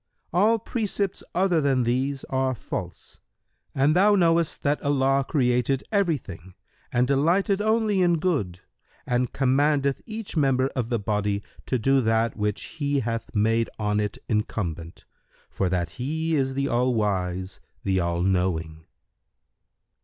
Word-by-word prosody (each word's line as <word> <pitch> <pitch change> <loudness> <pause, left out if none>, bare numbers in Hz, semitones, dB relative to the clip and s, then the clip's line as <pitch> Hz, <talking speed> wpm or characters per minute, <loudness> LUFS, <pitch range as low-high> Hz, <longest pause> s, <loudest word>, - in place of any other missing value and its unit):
All 210 +6 +4
precepts 205 -3 -2
other 180 -3 +2
than 135 -3 +2
these 130 +3 -1
are 130 -1 -1
false, - - -7 0.6
and 140 +4 +3
thou 205 +3 +5
knowest 165 -3 +2
that 145 +1 +1
Allah 135 -1 +2
created 125 -1 +1
every 195 -7 +2
thing 95 -5 -12 0.4
and 125 +1 +2
delighteth 175 +9 +2
only 215 -2 +2
in 175 -2 +3
Good 135 - -1 0.4
and 125 0 0
commandeth 140 +1 +1
each 220 -3 -6
member 135 -3 +2
of 125 -4 -3
the 120 - +1
body 105 -1 -1 0.2
to 130 - +1
do 135 +4 +3
that 115 0 +1
which 105 -1 -2 0.2
He 140 -1 +1
hath 115 -1 -4
made 115 +2 +2
on 105 -1 0
it 105 -1 -2
incumbent, 85 -7 -3 0.5
for 95 - -1
that 85 -3 -1
He 160 +4 -1
is 135 -2 0
the 140 0 0
All 125 +1 +1
wise, 95 -3 -2 0.2
the 95 -1 +1
All 85 0 0
knowing." 85 -4 -1
130 Hz, 140 wpm, -25 LUFS, 105-155 Hz, 0.6 s, thou